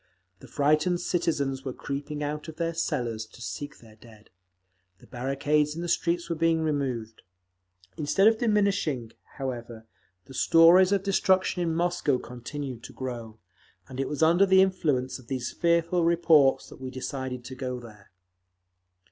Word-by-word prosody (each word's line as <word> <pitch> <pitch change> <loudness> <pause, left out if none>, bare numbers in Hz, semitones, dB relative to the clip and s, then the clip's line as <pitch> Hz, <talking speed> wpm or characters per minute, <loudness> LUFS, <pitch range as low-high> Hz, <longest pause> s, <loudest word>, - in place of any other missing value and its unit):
The - - -13
frightened 155 +4 +2
citizens 140 -8 -1
were 130 - -4
creeping 145 +3 -5
out 150 +2 -4
of 160 - -8
their 165 +1 -2
cellars 120 -9 -2
to 110 - -17
seek 145 +4 -6
their 110 -2 -17
dead; 110 -1 -18 0.7
the - - -19
barricades 145 +4 0
in 170 - -4
the - - -3
streets 170 0 0
were 170 - -2
being 165 0 +2
removed. 130 -8 -2 0.8
Instead 195 +7 +3
of 225 0 +4
diminishing, 200 - +1 0.3
however, 120 -4 -6 0.4
the 135 - -13
stories 170 +6 +6
of 200 -1 +1
destruction 190 -2 +2
in 165 -2 0
Moscow 175 -5 +1
continued 125 +1 -7
to - - -11
grow…. 120 -4 -6 0.5
And 130 - -9
it 135 - -1
was 150 +1 -1
under 175 +5 +5
the 190 0 +6
influence 145 -10 -1
of 125 - -17
these 125 -2 -3
fearful 170 +1 +1
reports 165 -5 +4
that - - -14
we 130 - -5
decided 130 -1 -5
to 130 - -7
go 130 -1 -4
there. 105 -4 -14
145 Hz, 155 wpm, -27 LUFS, 125-170 Hz, 0.8 s, stories